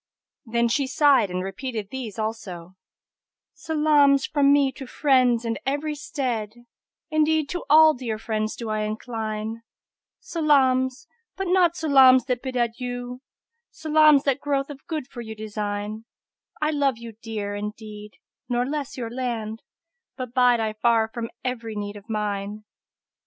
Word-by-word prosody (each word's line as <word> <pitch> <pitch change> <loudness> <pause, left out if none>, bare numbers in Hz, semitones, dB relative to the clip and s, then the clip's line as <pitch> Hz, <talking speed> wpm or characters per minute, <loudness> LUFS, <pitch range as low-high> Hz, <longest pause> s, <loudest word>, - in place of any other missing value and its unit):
Then 235 +1 +1
she 270 +3 0
sighed 280 -6 +4
and 180 0 -3
repeated 215 +1 -5
these 245 -6 -6
also, 195 -5 -5 0.8
"Salams 300 -3 +3
fro' 290 - -2
me 280 -1 +5
to 265 -1 -9
friends 255 -4 +2
in 225 -1 -2
every 290 +3 -1
stead; 240 -6 -4 0.2
* - - -58
Indeed 310 -1 +2
to 355 - -4
all 310 +1 +8
dear 240 -5 -4
friends 215 -1 -2
do 230 -2 -5
I 215 - -1
incline: 220 0 -4 0.6
Salams, 270 - +2 0.3
but 385 - -2
not 355 -2 +3
salams 265 -6 +6
that 250 -2 -1
bid 260 -1 -5
adieu; 245 +1 -3 0.3
* 465 +1 -55
Salams 305 -2 +5
that 275 -1 +1
growth 280 -1 -1
of 275 -1 -12
good 310 -5 -4
for 250 -3 -8
you 220 -1 -7
design: 210 0 -4 0.5
I 305 0 +1
love 280 -5 +1
you 230 0 -9
dear, 210 -3 -4
indeed, 210 0 -7 0.4
nor 245 0 +1
less 285 -1 -4
your 230 -2 -4
land, 230 -3 -3 0.3
* 480 +8 -59
But 255 -3 -6
bide 245 -2 +4
I 220 -1 -1
far 225 0 +2
from 230 0 -5 0.2
every 230 -3 -3
need 205 0 -4
of 205 +2 -13
mine!" 210 -1 -3
245 Hz, 150 wpm, -24 LUFS, 220-285 Hz, 0.8 s, all